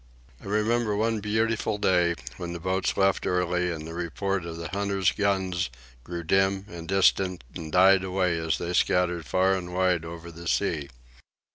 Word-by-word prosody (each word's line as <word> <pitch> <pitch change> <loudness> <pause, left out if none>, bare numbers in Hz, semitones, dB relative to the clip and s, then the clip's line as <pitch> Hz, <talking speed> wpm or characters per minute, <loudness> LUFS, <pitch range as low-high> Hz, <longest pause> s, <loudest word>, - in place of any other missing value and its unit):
I - - -14
remember 105 +1 +1
one 110 +1 0
beautiful 110 +1 0
day, 90 -4 +2 0.2
when 85 -2 -5
the 85 - -5
boats 95 +2 -1
left 95 -1 +2
early 90 0 +1
and 80 -2 -5
the 80 - -7
reports 90 +2 -2
of 85 -1 -6
the 85 0 -5
hunters' 100 -1 +1
guns 95 -6 0 0.3
grew 85 +2 -5
dim 95 +3 +2
and 85 -3 -8
distant 95 -3 +2
and 80 -1 -7
died 95 +2 +6
away 90 -3 0
as 80 0 0
they 85 +1 -3
scattered 90 -3 +1
far 95 +8 +3
and 90 -1 -4
wide 90 -3 +2
over 85 0 -8
the 85 +1 -9
sea. 75 -3 0
90 Hz, 170 wpm, -26 LUFS, 85-95 Hz, 0.3 s, died